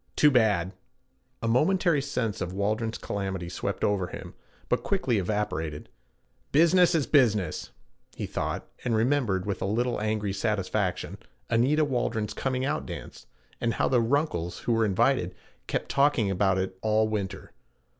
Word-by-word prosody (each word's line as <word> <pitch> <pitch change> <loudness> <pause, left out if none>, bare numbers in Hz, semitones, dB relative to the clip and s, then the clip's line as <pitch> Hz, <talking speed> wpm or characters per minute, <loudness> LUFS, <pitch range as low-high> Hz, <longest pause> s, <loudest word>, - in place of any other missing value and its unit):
Too 150 - +5
bad.' 105 -8 +3 0.7
A - - 0
momentary 160 +5 +3
sense 125 -7 -2
of 90 +1 -3
Waldron's 110 +3 -1
calamity 95 -3 -4
swept - - -3
over 100 -3 +1
him, - - -8 0.3
but - - +1
quickly 135 - 0
evaporated. 90 -6 -2 0.6
'Business 170 +3 +5
is 150 -4 +2
business,' 110 - +2 0.5
he - - -4
thought, - - -3 0.2
and 120 -2 +1
remembered, 110 -6 +1
with 100 -2 -3
a - - 0
little 120 +3 0
angry 105 -2 -1
satisfaction, 100 -2 -1 0.3
Anita 135 +7 +3
Waldron's 110 -6 -1
coming 130 +2 -1
out - - -2
dance - - -8 0.3
and 115 - 0
how - - +1
the 125 -2 +3
Runkles, 115 - -1
who 120 - +1
were 115 -1 +3
invited, 95 -3 +1 0.3
kept - - -2
talking 140 -7 +3
about 95 0 +2
it 95 0 -3
all 110 0 +2
winter. 100 -3 -4
110 Hz, 145 wpm, -27 LUFS, 95-130 Hz, 0.7 s, Too